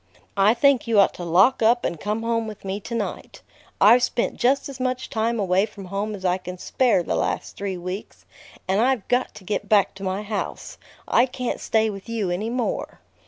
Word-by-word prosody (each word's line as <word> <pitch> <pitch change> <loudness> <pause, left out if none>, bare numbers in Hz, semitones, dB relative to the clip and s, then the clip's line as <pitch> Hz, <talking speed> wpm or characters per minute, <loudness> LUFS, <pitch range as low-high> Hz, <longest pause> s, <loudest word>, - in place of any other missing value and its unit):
I 205 +4 +5
think 265 0 +3
you 225 -3 +4
ought 200 - +5
to 175 - -8
lock 185 +10 +4
up 235 +2 +3
and 170 - -2
come 215 +2 -2
home 230 -1 0
with 210 -2 -9
me 195 +1 -3
to 235 +3 -6
night. 220 -3 -5 0.4
I've 230 +5 +7
spent 240 -1 0
just 265 +3 +2
as 275 -2 -9
much 255 0 -2
time 225 +1 0
away 190 +1 +2
from 205 -3 -11
home 200 +3 -3
as 190 -1 -8
I 180 +1 +2
can 180 0 -7
spare 230 -1 +1
the - - -2
last - - -2
three 195 -2 -4
weeks, 180 +3 -7 0.4
and 190 +3 +2
I've 255 -4 +1
got 250 +1 0
to - - -12
get 205 +1 -3
back 205 -3 +4
to 195 - -10
my 190 +2 -2
house. 210 -1 -5 0.3
I 245 +3 +4
can't 250 -1 -4
stay 220 -1 +1
with 195 +2 -10
you 215 -6 -1
any 205 +6 -2
more." 245 0 -3
215 Hz, 210 wpm, -23 LUFS, 195-235 Hz, 0.4 s, I've